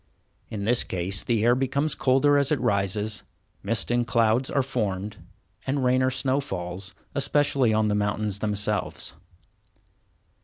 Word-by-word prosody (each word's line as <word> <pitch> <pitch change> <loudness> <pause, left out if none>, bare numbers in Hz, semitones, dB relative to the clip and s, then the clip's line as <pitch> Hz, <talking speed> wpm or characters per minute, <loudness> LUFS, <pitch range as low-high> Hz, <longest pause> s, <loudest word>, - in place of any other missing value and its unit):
In 105 -2 -4
this 120 +3 +3
case 95 +2 -2
the 115 -3 +1
air 120 +1 +5
becomes 135 +4 0
colder 135 +2 +3
as 140 0 +2
it 150 - +2
rises, 105 -1 0 0.4
mist 110 +2 -1
and 120 -1 +1
clouds 115 +2 +2
are 140 - +1
formed, 105 -6 -2 0.5
and 135 0 0
rain 130 +1 +3
or 130 - +3
snow 130 +1 0
falls, 90 -6 -5 0.2
especially 140 -3 +2
on 110 0 +2
the 105 - +1
mountains 105 0 -1
themselves. 105 0 -2
115 Hz, 145 wpm, -26 LUFS, 105-130 Hz, 0.5 s, air